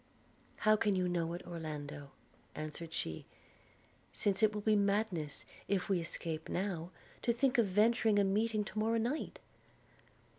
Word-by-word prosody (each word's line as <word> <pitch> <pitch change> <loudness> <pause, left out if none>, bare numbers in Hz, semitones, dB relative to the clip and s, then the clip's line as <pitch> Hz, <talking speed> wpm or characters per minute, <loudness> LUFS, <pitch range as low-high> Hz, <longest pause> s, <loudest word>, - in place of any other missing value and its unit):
'How 215 0 +4
can 210 -2 +2
you 185 -1 +1
know 170 -1 0
it, 175 - -6
Orlando,' 150 -4 -6 0.5
answered 155 +2 -5
she, 80 - -4 0.8
'since 190 - 0
it 215 -1 +5
will 210 0 -4
be 215 +1 +3
madness, 200 -7 0 0.2
if 200 +1 0
we 190 -3 +3
escape 165 -1 -4
now, 180 -3 -2 0.3
to 235 - +2
think 250 +1 +2
of 225 - +4
venturing 215 +2 +4
a 200 - +5
meeting 215 +2 +1
to 215 - -5
morrow 225 +2 +2
night?' 245 +7 -1
200 Hz, 150 wpm, -35 LUFS, 165-215 Hz, 0.8 s, it